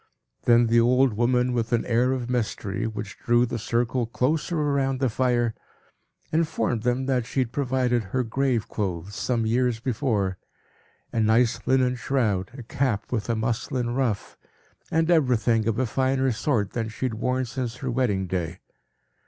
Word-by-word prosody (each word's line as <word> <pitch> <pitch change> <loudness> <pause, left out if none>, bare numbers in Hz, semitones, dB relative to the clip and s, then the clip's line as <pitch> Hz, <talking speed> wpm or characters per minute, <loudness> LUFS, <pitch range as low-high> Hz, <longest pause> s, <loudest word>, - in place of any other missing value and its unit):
Then 120 0 +5
the 115 +1 +4
old 125 +1 +4
woman, 125 +2 +2
with 115 -2 -1
an 120 -1 +1
air 125 +2 +2
of 130 -2 -2
mystery, 110 -4 -2
which 105 -2 -6
drew 120 0 +3
the 120 -1 -4
circle 120 +2 0
closer 150 +8 0
round 140 -3 0
the 130 -2 +2
fire, 120 -1 +1 0.8
informed 155 -7 0
them 125 +2 0
that 125 -3 0
she 135 - 0
had 120 -2 -2
provided 125 -4 0
her 125 +7 -1
graveclothes 110 -7 -2
some 115 +1 -1
years 120 0 +1
before, 110 -6 -1 0.7
a 115 - 0
nice 110 +2 +3
linen 130 -1 +3
shroud, 110 -8 0
a 125 - -7
cap 130 -4 -1
with 120 -2 -2
a 115 - +2
muslin 120 +2 -1
ruff, 120 -6 -2 0.5
and 160 +2 +2
everything 120 -7 +3
of 115 -1 0
a 130 - +1
finer 130 +2 +1
sort 110 -4 0
than 115 -2 -2
she 110 - -4
had 125 - -1
worn 125 +3 -1
since 120 0 -4
her 130 0 -4
wedding 115 -6 0
day. 85 -1 -3
120 Hz, 160 wpm, -25 LUFS, 110-130 Hz, 0.8 s, Then